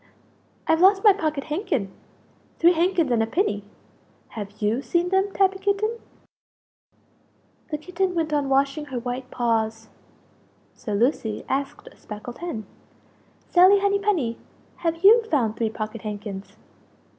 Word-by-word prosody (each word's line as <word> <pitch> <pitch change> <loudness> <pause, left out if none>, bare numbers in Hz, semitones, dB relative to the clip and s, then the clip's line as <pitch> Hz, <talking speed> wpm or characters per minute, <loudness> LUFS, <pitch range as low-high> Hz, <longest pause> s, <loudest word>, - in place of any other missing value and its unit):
"I've 320 +1 +2
lost 390 +1 +5
my 415 -3 +8
pocket 310 -7 -2
handkin! 295 - -2 0.7
Three 345 +1 +5
handkins 340 -4 +1
and 235 -2 +3
a 225 - 0
pinny! 225 - 0 0.7
Have 205 -1 -8
you 220 +4 0
seen 345 +4 0
them, 385 +1 +1
Tabby 385 -1 +2
Kitten?" 410 +4 0 1.7
The 300 - -2
Kitten 360 +3 -2
went 320 -2 -1
on 285 -2 0
washing 275 +2 +1
her 265 -3 -6
white 250 +1 -4
paws; 225 -2 -1 0.8
so 210 -4 -5
Lucie 225 -1 0
asked 275 +1 -3
a - - -20
speckled 215 +3 -9
hen 330 -12 -5 0.9
"Sally 370 +3 +7
Henny 400 0 +1
penny, 335 - 0 0.4
have 330 +1 -2
you 450 +4 +8
found 245 - 0
three 225 -1 -1
pocket 215 0 -6
handkins?" 205 -2 -7
295 Hz, 135 wpm, -24 LUFS, 225-370 Hz, 1.7 s, my